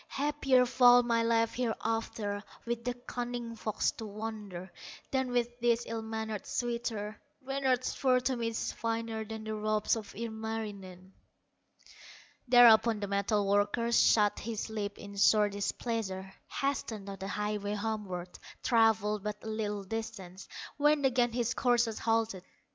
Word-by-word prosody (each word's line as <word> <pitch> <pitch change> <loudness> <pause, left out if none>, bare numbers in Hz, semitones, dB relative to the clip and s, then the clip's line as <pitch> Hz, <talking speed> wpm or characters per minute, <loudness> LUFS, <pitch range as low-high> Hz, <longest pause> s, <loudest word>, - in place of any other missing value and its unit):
Happier 275 -3 +2
far 245 0 +6
my 230 -1 +2
life 230 0 +2
hereafter, 225 -3 -2 0.2
With 235 0 -3
the 245 0 -1
cunning 245 -1 -5
fox 215 -1 0
to 225 - -8
wander, 205 -4 -6 0.4
Than 265 -1 0
with 240 0 -1
this 235 0 +2
ill 225 0 -4
mannered 220 -2 -4
suitor; 235 -3 -3 0.2
Reynard's 265 -2 0
fur 255 -2 +3
to 260 +1 0
me 235 -1 -2
is 230 0 -2
finer 225 -1 -3
Than 220 0 -7
the 220 0 -4
robes 215 0 +1
of 215 -3 -8
Ilmarinen." 215 -4 -6 1.4
Thereupon 235 -2 +7
the 205 - -3
metal 200 +1 +1
worker 205 +4 +1
Shut 210 -3 +4
his 220 0 -4
lips 205 -2 -4
in 200 0 -9
sore 210 +1 +5
displeasure, 200 -1 -3 0.2
Hastened 235 -7 -2
on 195 -1 -7
the 190 - -5
highway 210 0 -2
homeward; 200 -5 -4 0.2
Travelled 220 -3 +3
but 210 -1 -5
a - - -7
little 210 -2 -2
distance, 195 -3 -6 0.3
When 295 -1 +3
again 245 -2 +3
his 240 0 0
courser 240 -2 +2
halted. 225 -4 +1
225 Hz, 140 wpm, -31 LUFS, 205-240 Hz, 1.4 s, Thereupon